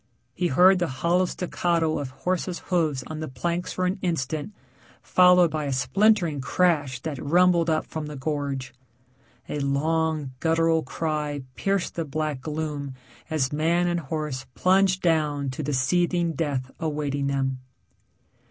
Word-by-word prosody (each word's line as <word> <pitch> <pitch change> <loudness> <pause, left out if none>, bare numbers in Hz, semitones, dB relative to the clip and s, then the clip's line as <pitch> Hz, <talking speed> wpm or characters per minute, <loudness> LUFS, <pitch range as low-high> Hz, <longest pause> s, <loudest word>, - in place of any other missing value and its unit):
He 180 - 0
heard 180 +5 +5
the 175 - +1
hollow 170 +7 +1
staccato 170 -3 0
of 140 - -4
horse's 175 +6 -2 0.2
hoofs 155 -7 +1
on 155 -1 -6
the 155 - -4
planks 170 +7 -3
for 185 - -1
an 185 +2 -1
instant, 160 0 -2 0.5
followed 180 -2 +5
by 155 -1 -2
a 140 - -2
splintering 160 - +2
crash 145 -5 +1
that 150 -3 -5
rumbled 170 +2 +4
up 155 -1 +1
from 155 -2 -5
the 150 - -7
gorge. 140 -2 -3 0.7
A 150 - -3
long, 155 +1 0
guttural 165 0 +2
cry 150 -1 -3
pierced 195 +3 -1
the 170 - -2
black 150 -2 -3
gloom 150 -2 -4 0.3
as 150 -3 0
man 165 +4 +2
and 175 0 0
horse 150 -3 -4
plunged 190 0 +3
down 150 -5 +1
to 130 - -5
the 150 0 -2
seething 170 +5 +1
death 135 -4 -2
awaiting 145 -3 -2
them. 135 -1 -1
155 Hz, 145 wpm, -25 LUFS, 140-175 Hz, 0.7 s, heard